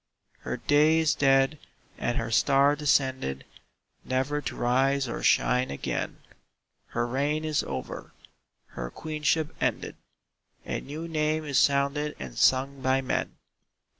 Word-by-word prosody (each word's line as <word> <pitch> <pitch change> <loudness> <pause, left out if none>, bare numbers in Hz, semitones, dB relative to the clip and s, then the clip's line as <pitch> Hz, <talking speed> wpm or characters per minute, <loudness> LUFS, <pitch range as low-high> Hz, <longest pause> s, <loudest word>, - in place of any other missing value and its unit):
Her - - -4
day 150 +2 +3
is 160 -2 +3
dead 135 +1 +3 0.4
and 120 - -1
her 115 0 -2
star 140 +4 +4
descended 130 - 0 0.6
Never 135 +3 -1
to - - -5
rise 135 +2 +1
or 120 - -4
shine 125 +1 +2
again; 70 - -3 0.7
Her 120 0 -2
reign 145 +5 -1
is 155 -2 +1
over - - -6 0.6
her - - -6
Queenship 155 - -1
ended - - -1 0.7
A - - -3
new 155 +4 -7
name 155 -1 -1
is 140 -3 +2
sounded 140 +2 +1
and 65 -3 -8
sung 135 - +2
by 130 +1 +2
men. 130 - -2
140 Hz, 130 wpm, -27 LUFS, 130-150 Hz, 0.7 s, star